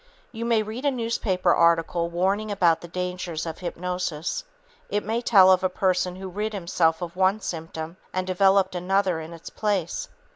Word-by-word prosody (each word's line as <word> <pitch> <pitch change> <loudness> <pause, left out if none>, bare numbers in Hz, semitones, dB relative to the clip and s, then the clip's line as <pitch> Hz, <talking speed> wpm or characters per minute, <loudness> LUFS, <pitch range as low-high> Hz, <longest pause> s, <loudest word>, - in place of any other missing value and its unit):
You 230 -1 -5
may 230 -2 +2
read 220 +5 -6
a 285 - +3
newspaper 225 -8 0
article 170 0 +2
warning 195 +5 0
about 175 -5 +2
the 175 - -9
"dangers" 180 -2 -4
of 165 -1 -6
hypnosis. 180 - -3 0.5
It 205 +1 -1
may 225 +2 -1
tell 195 -6 +6
of 185 0 +3
a 185 - +2
person 180 -1 0
who 190 +1 -7
rid 210 +4 -3
himself 170 -3 +1
of 170 0 -6
one 190 +3 +2
symptom 165 -2 -6
and 185 0 -2
developed 190 +1 +3
another 185 -1 +1
in 160 +1 -8
its 165 -1 -10
place. 200 -6 -2
185 Hz, 175 wpm, -25 LUFS, 170-200 Hz, 0.5 s, tell